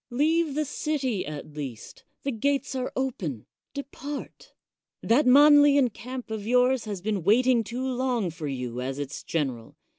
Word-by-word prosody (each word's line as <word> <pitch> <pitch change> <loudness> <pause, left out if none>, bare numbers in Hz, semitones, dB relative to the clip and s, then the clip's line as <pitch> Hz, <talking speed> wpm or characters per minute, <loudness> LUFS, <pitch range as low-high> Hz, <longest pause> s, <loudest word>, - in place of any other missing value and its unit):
Leave 305 +4 +1
the 305 0 0
city 275 -7 -2
at 150 0 -7
least; 135 -7 -8 0.2
the 275 - -1
gates 275 +5 -1
are 260 -1 -3
open; 185 - -3 0.3
depart. 280 +1 -7 0.5
That 255 +5 +3
Manlian 285 -2 +6
camp 250 -1 -7
of 215 -1 -4
yours 250 0 +3
has 205 -4 -5
been 205 -2 -1
waiting 235 +4 +4
too 245 +4 -4
long 250 -7 -1
for 160 -2 -6
you 125 -3 -4
as 135 +1 -3
its 145 -1 -5
general. 130 -8 -3
245 Hz, 150 wpm, -26 LUFS, 165-275 Hz, 0.5 s, Manlian